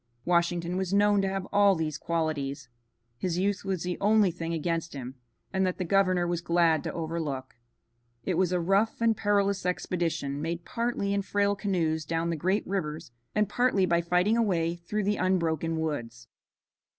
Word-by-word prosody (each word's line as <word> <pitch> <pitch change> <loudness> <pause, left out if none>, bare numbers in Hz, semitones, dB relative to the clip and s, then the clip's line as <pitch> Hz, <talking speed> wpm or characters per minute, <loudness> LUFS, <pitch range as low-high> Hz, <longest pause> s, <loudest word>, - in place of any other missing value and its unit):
Washington 175 0 +1
was 190 0 -1
known 205 0 +4
to 195 - 0
have 190 -1 -3
all 200 -1 +5
these 155 -2 -2
qualities. 145 -5 -2 0.5
His 175 +2 -1
youth 200 +1 0
was 190 -3 -2
the 180 0 -3
only 210 -2 +4
thing 165 -1 -5
against 165 -1 -2
him, 130 -1 -6 0.4
and 190 0 +2
that 185 -1 0
the 185 - -2
governor 185 -1 +2
was 175 -1 -1
glad 170 -3 +2
to - - -4
overlook. 160 -5 -4 0.7
It 185 - -1
was 180 +1 +1
a 180 - +1
rough 195 +6 +1
and 230 -1 +3
perilous 200 -2 +1
expedition, 170 -5 -2
made 170 +2 -3
partly 230 -4 -1
in 200 - +1
frail 200 +1 +1
canoes 170 -6 0
down 165 +2 -1
the - - -1
great 185 +7 0
rivers, 155 -8 -3 0.2
and 210 -1 +3
partly 245 -6 +2
by 170 -1 +2
fighting 180 +6 +2
a - - +3
way 170 -6 +1
through 190 +5 -3
the 205 +1 +1
unbroken 165 -3 0
woods. 120 -7 -4
175 Hz, 175 wpm, -28 LUFS, 165-195 Hz, 0.7 s, all